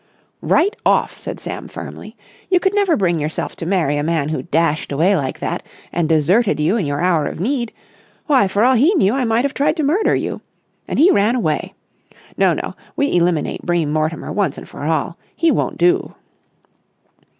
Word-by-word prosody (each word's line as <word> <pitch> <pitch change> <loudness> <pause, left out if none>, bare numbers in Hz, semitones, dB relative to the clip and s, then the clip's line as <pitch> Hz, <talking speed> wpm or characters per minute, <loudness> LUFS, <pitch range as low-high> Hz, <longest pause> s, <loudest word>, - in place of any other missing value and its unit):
"Right 410 +5 +2
off!" - - +2
said - - -7
Sam - - -6
firmly. - - -9 0.3
"You 365 - +4
could 385 +2 0
never 400 -5 +2
bring 175 -4 +1
yourself 150 +1 -3
to 165 - -5
marry 170 -6 +1
a - - 0
man 155 -2 0
who 155 - -2
dashed 165 -3 0
away 170 +8 +3
like 135 -6 -2
that - - -3 0.3
and 170 -2 -1
deserted 170 +7 +2
you 160 +7 +2
in 195 -10 -1
your 145 +2 -2
hour 170 -5 +2
of - - -6
need. 235 +3 -1 0.5
Why, 265 -9 +3
for 200 +3 +1
all 255 +2 +5
he 290 - +4
knew, 215 - +3
I 265 -1 0
might 230 +3 +1
have 280 - -1
tried 300 +3 +1
to 310 - 0
murder 330 +10 +2
you. - - -3 0.5
And - - -3
he 340 +6 +6
ran 210 +4 +3
away! 160 -11 -2 0.6
No, - - +3
no, - - -5 0.2
we 285 -7 0
eliminate 175 -3 +1
Bream 170 -4 0
Mortimer 155 +1 -2
once 195 -8 -1
and - - -9
for 145 - -8
all. 160 +4 -1 0.2
He 330 -1 +2
won't - - -1
do!" 175 +1 +1
185 Hz, 195 wpm, -19 LUFS, 155-260 Hz, 0.6 s, he